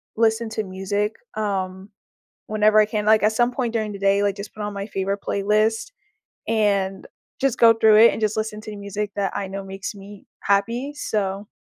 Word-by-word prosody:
listen 225 0 +1
to 220 0 -3
music, 200 +2 -2 0.2
um, 195 -2 -3 0.6
whenever 215 0 +4
I 215 - +6
can, 210 0 -3
like, 215 0 +5
at 215 +1 +3
some 240 +2 +2
point 245 -2 -2
during 215 -2 -1
the 200 - -8
day, 200 +1 +3
like, 200 -1 +1
just 200 0 -8
put 215 - -5
on 210 0 -4
my 200 0 -5
favorite 195 -1 -2
playlist, 215 - 0 0.6
and 200 -3 0 0.3
just 270 -3 +1
go 230 -1 +8
through 220 -1 +5
it, 230 +2 +8
and - - -5
just 215 -1 0
listen 215 -1 -3
to 215 - -9
the 210 - -7
music 200 +1 -4
that 195 -2 -1
I 200 - -2
know 195 +1 -6
makes 195 +2 -6
me 200 0 -12
happy. 230 +8 0
So, 200 -6 -2
210 Hz, 200 wpm, -22 LUFS, 200-220 Hz, 0.6 s, go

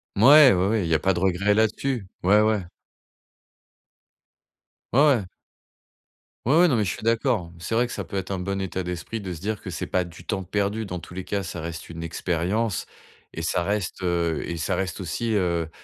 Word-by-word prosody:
Mouais, 140 +6 +8
oui, 90 -1 +2
oui, 110 +2 +2
il 85 - -2
y - - +2
a 80 - +4
pas 95 +4 +2
de 85 - -2
regret 95 +2 +2
là-dessus, 110 +2 0 0.2
ouais, 105 +4 +5
ouais. 110 -3 +1 2.3
Ouais, 135 - +4 0.2
ouais. 110 - -2 1.2
Oui, 135 +6 +3
oui, 180 - +6
non 140 - +2
mais 110 - +2
je 95 - -1
suis - - -11
d'accord, 110 -6 +1
c'est 100 +6 -3
vrai 120 +2 +3
que 120 - -6
ça - - -4
peut 100 - -9
être 95 0 -4
un 95 - -2
bon 100 +2 -2
état 95 -1 -3
d'esprit 90 +5 -5
de 95 -2 -5
se 85 - -6
dire 105 +1 -3
que - - -7
c'est 80 - -4
pas 90 - 0
du 85 +1 -12
temps 95 - -2
perdu 100 +3 -1
dans 90 - -4
tous 90 - -12
les 95 +1 -5
cas, 100 +1 -2
ça 90 -2 -6
reste 85 0 -6
une 85 0 -7
expérience 90 +5 -1 0.4
et 80 - -6
ça 85 - 0
reste, 100 0 -2
heu 85 -3 0
et 85 - -4
ça 85 +4 -1
reste 95 +1 -3
aussi, 95 +7 -2
heu, 85 -4 0
95 Hz, 215 wpm, -25 LUFS, 85-110 Hz, 2.3 s, Mouais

